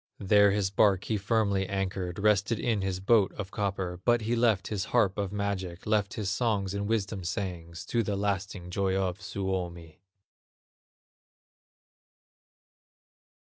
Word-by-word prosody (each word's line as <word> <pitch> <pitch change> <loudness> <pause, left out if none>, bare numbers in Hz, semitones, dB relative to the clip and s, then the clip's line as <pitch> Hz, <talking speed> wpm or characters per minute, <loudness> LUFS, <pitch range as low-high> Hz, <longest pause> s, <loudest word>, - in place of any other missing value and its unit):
There 100 +1 +5
his 100 -1 0
bark 100 -1 +3
he 110 - -1
firmly 100 -2 +1
anchored, 95 -2 -2
Rested 105 +2 +2
in 110 -4 0
his 95 -1 -2
boat 100 +1 +4
of 100 -3 -6
copper; 95 -3 -2
But 120 -1 +3
he 115 +2 0
left 115 -6 +2
his 100 -3 -2
harp 105 -5 +2
of 100 -2 -2
magic, 100 -4 -3
Left 105 -2 +1
his 105 -3 -3
songs 105 -4 0
and 100 0 -2
wisdom 105 -3 -1
sayings, 85 -3 -4
To 120 - +1
the 105 -2 -1
lasting 100 -2 -2
joy 95 0 0
of 95 0 -1
Suomi. 90 -4 -4
100 Hz, 135 wpm, -29 LUFS, 95-105 Hz, -, There